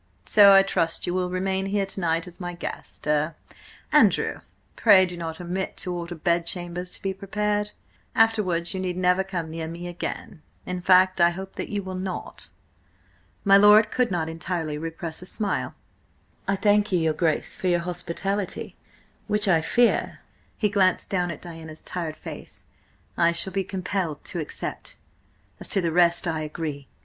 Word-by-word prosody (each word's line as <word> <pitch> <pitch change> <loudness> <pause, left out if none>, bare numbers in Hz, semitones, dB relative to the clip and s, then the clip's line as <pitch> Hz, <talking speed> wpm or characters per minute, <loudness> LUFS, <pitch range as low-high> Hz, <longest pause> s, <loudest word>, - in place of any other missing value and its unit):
So 200 - +7
I 195 - +8
trust 165 -4 0
you 175 - -2
will 180 0 0
remain 190 +1 -1
here 200 0 0
to 195 - -4
night 165 -1 0
as 180 +1 -11
my 175 -1 -5
guest–er, 150 -2 -2 0.6
Andrew, - - +3 0.4
pray 200 -4 +6
do 180 -1 -6
not 165 -1 -5
omit 180 +2 -4
to 180 - -3
order 175 0 -5
bed 170 +1 0
chambers 180 0 -4
to - - -7
be 195 -1 -1
prepared— 210 +2 -1 0.5
Afterwards 205 -7 +2
you 190 - -3
need 180 -1 -3
never 180 +1 +3
come 175 -4 -4
near 160 0 -4
me 170 +2 -7
again–in 175 +1 -7
fact, 185 0 +4
I 170 - +7
hope 190 +2 -7
that - - -5
you 205 -1 -2
will 190 0 -6 0.2
not." - - -11 0.9
My 195 -1 +7
lord 210 +2 +7
could 250 -1 +1
not 175 -4 -1
entirely 165 -1 -3
repress 165 +1 -6
a 180 - -9
smile. 205 0 -1 0.7
"I 200 - +2
thank 205 +1 +2
your 160 -3 +2
Grace 160 -1 0
for 185 - -3
your 175 -1 +2
hospitality, 180 +3 -3 0.5
which 210 0 +2
I 170 -4 +4
fear," 235 +9 +1 0.4
he 210 - +2
glanced 195 -3 +2
down 180 -2 0
at 165 - -7
Diana's 160 -2 -9
tired 165 -3 -4
face, - - -10 0.5
"I 170 0 +4
shall 175 +3 +1
be 195 0 0
compelled 185 -5 -3
to 175 - -4
accept. 155 - -6 0.6
As - - -3
to 195 - +4
the 170 -3 0
rest–I 170 -1 +2
agree. 150 -2 -5
180 Hz, 165 wpm, -25 LUFS, 170-195 Hz, 0.9 s, I